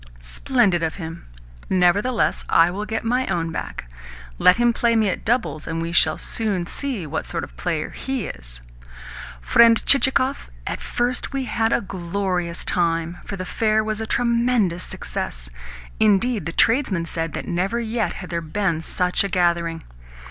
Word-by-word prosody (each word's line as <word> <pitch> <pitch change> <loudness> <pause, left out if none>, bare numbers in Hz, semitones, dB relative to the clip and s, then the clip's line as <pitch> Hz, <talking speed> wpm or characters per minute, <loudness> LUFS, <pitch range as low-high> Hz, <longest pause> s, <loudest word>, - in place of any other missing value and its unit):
"Splendid 175 - +1
of 160 -1 -1
him! 165 -2 -8 0.4
Nevertheless 195 +6 +2
I 165 +1 +5
will 205 +3 -4
get 225 0 -2
my 250 +3 0
own 165 -1 -1
back. 110 - -5 0.5
Let 180 - +6
him 240 0 +3
play 235 0 +2
me 220 -3 +3
at 185 - -3
doubles, 225 -9 -1
and 165 0 -2
we 165 0 -3
shall 160 -2 +3
soon 205 -6 -1
see 250 - -4
what 155 +1 -4
sort 165 - -2
of - - -8
a - - -23
player 160 -3 -3
he 265 -5 -3
is! - - -8 0.8
Friend 230 - +6
Chichikov, 265 0 +2 0.2
at - - -4
first 245 +3 -2
we 270 -1 -1
had 225 0 0
a - - +2
glorious 180 -2 -3
time, 170 0 0
for 200 - -5
the 185 -1 -5
fair 215 +2 +1
was 215 0 -2
a 220 - -4
tremendous 235 -7 +1
success. - - -4 0.5
Indeed, 215 -2 +2
the - - -2
tradesmen 220 -4 +2
said 165 -1 -2
that - - -5
never 190 +6 -1
yet 225 -1 -1
had 180 - -8
there 170 0 -1
been 165 0 -1
such 180 +3 +1
a 200 - -2
gathering. 170 -2 0
190 Hz, 170 wpm, -22 LUFS, 170-230 Hz, 0.8 s, Let